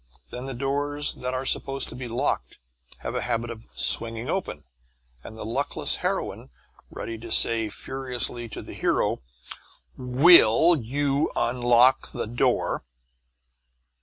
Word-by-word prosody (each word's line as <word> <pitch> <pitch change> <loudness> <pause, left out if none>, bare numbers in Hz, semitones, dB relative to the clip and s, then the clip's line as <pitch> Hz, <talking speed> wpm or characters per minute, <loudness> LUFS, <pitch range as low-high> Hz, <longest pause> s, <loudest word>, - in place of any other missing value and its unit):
Then 125 +2 -7
doors 145 +2 -1
that 125 0 -5
are 130 +1 -3
supposed 135 +1 +1
to - - -9
be 125 0 -6
locked 120 - -2 0.4
have - - -5
a - - -2
habit 115 +1 -2
of 115 -1 -11
swinging 115 +4 +1
open, 175 - -4 0.6
and 110 - -11
the 110 - -7
luckless 130 +6 0
heroine, 65 - -3 0.4
ready 115 -1 -7
to 115 0 -10
say 115 -1 +4
furiously 125 0 -2
to - - -7
the - - -10
hero, - - 0 0.7
"Will 140 +3 +5
you 140 +3 -1
unlock 120 +1 +2
the - - -3
door?" 120 +3 -1
125 Hz, 130 wpm, -25 LUFS, 115-135 Hz, 0.7 s, Will